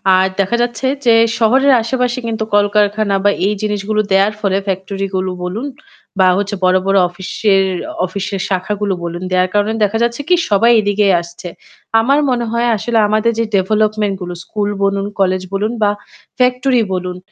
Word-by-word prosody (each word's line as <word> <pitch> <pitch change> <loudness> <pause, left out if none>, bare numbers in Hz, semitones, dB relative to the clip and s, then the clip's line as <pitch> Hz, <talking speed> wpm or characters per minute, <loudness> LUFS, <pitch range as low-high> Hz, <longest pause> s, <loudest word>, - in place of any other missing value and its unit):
আর 185 - +3
দেখা 195 +5 +1
যাচ্ছে 240 +2 -1 0.2
যে 230 -1 +5 0.2
শহরের 265 +5 +4
আশেপাশে 250 +1 -1
কিন্তু 220 -1 -2
কলকারখানা 205 0 +2
বা 205 - +5 0.2
এই 210 - +1
জিনিসগুলো 210 0 -1
দেয়ার 195 +2 +3
ফলে 195 -1 +1
ফ্যাক্টরি 195 +1 -3
গুলো 185 0 -1
বলুন 215 +10 -4 0.5
বা 185 - +5
হচ্ছে 205 0 -2
বড়, 185 0 +4
বড় 195 0 +3
অফিসের 195 +2 0 0.4
অফিসের 195 +1 -4
শাখাগুলো 200 +1 -1
বলুন। 170 +1 -5
দেয়ার 185 0 +2
কারণে 205 +2 +1
দেখা 210 +2 +1
যাচ্ছে 235 +4 -1
কি 360 - +6
সবাই 225 +4 +4
এদিকেই 205 -1 +2
আসছে। 170 +1 -10 0.5
আমার 275 +6 +2
মনে 240 -2 0 0.3
আসলে 230 +3 -1
আমাদের 215 +2 +1
যে 230 - +1
ডেভেলপমেন্ট 210 +1 +1
গুলো 175 0 -5
স্কুল 205 -1 -3
বলুন, 195 0 0
কলেজ 185 -1 +1
বলুন 210 +3 -1
বা 205 - +3 0.5
ফ্যাক্টরি 250 -1 +2
বলুন 180 0 -4
205 Hz, 160 wpm, -16 LUFS, 190-225 Hz, 0.5 s, কি